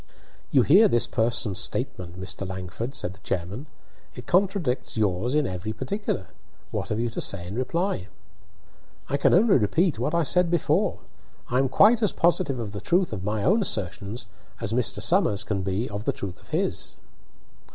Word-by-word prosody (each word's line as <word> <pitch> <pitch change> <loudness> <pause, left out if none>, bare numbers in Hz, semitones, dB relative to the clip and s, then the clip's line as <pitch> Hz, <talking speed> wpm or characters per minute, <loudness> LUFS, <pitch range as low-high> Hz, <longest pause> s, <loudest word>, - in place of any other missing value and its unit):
"You 130 - +4
hear 195 - +7
this 120 - +2
person's 115 -3 0
statement, 90 0 -2
Mr. 95 0 -5
Langford," 95 +7 -5
said 90 - -3
the 95 - -18
chairman. 100 - -4 0.5
"It 125 - -9
contradicts 180 - 0
yours 105 +5 0
in 150 -1 +3
every 95 +1 -4
particular. 195 - -3 0.4
What - - -3
have 105 - -1
you 120 0 -1
to - - -4
say 90 -3 -1
in 90 - -7
reply?" 130 - -1 1.0
"I 140 - +1
can 140 - +3
only 195 - +5
repeat 160 - +1
what 155 - 0
I 170 - +3
said 180 +4 +3
before. 175 +3 +1 0.5
I 125 - +3
am 135 -1 +2
quite 220 - +5
as 215 - +2
positive 170 -5 +2
of 115 -4 -4
the 100 -1 -6
truth 175 - +1
of 95 -3 -5
my 105 +1 -1
own 210 +6 +4
assertions 100 - -2 0.3
as 115 -2 -3
Mr. 115 -3 0
Somers 110 - +3
can 100 -2 -2
be 95 +5 -1
of 105 +1 -6
the - - +1
truth 95 -3 -6
of - - -21
his." - - -2
120 Hz, 180 wpm, -25 LUFS, -, 1.0 s, hear